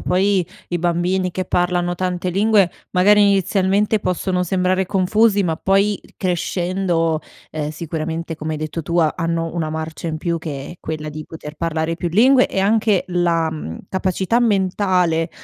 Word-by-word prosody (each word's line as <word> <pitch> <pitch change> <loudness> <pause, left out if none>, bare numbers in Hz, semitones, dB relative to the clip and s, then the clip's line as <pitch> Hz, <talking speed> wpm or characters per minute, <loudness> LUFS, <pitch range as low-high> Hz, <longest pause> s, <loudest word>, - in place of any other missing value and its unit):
poi 185 -1 +1 0.2
i 175 - -1
bambini 175 +2 0
che 185 - -2
parlano 175 0 0
tante 180 0 -2
lingue, 200 -1 +3 0.2
magari, 205 +3 +5
inizialmente, 200 +2 +2
possono 180 0 -1
sembrare 185 +1 +1
confusi, 200 +2 +2
ma 165 -3 -1
poi 195 +2 +1 0.2
crescendo, 175 -2 0 0.3
ehm, 150 -1 -3
sicuramente, 165 0 -4
come 155 0 -4
hai 155 - -3
detto 155 +2 -4
tu, 170 +3 -3
ha 155 -2 +3
hanno 165 0 -1
una 160 -3 -2
marcia 160 +1 -5
in 155 -1 -3
più 170 0 -1
che 145 -4 -6
è - - -8
quella 155 -1 -5
di 155 0 -7
poter 155 -1 -9
parlare 165 0 -1
più 175 - -2
lingue 250 +8 +5
e 190 - -2
anche 210 -1 +2
la, 170 -2 +1
mhmm, 150 - -6
capacità 190 +4 0
mentale 185 -6 +1
175 Hz, 160 wpm, -20 LUFS, 165-190 Hz, 0.3 s, magari